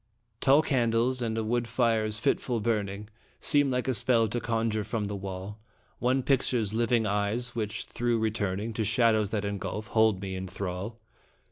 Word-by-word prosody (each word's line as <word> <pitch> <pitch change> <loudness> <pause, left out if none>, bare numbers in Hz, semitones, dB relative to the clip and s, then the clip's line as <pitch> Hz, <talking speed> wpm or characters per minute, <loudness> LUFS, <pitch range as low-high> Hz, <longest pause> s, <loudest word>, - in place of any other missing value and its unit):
Tall 140 +3 +5
candles 125 -2 +1
and 115 -1 -1
a 110 - 0
wood 120 +2 0
fire's 115 -2 +1
fitful 120 0 0
burning 105 -2 -2 0.3
Seem 145 -2 +3
like 125 0 -1
a 130 - +2
spell 115 0 +3
to 120 - -1
conjure 115 -2 0
from 105 +1 -2
the 100 0 -3
wall 95 +2 -6 0.4
One 130 +2 +1
picture's 120 -6 +1
living 115 0 +2
eyes, 105 +4 0
which, 110 -1 -3
though 120 0 -1
returning 110 -1 -1
To 110 - -1
shadows 110 -1 +3
that 105 -1 -2
engulf, 100 +2 -4
hold 110 -3 +3
me 95 -1 -4
in 95 0 -4
thrall. 95 +4 -5
110 Hz, 165 wpm, -28 LUFS, 105-120 Hz, 0.4 s, Tall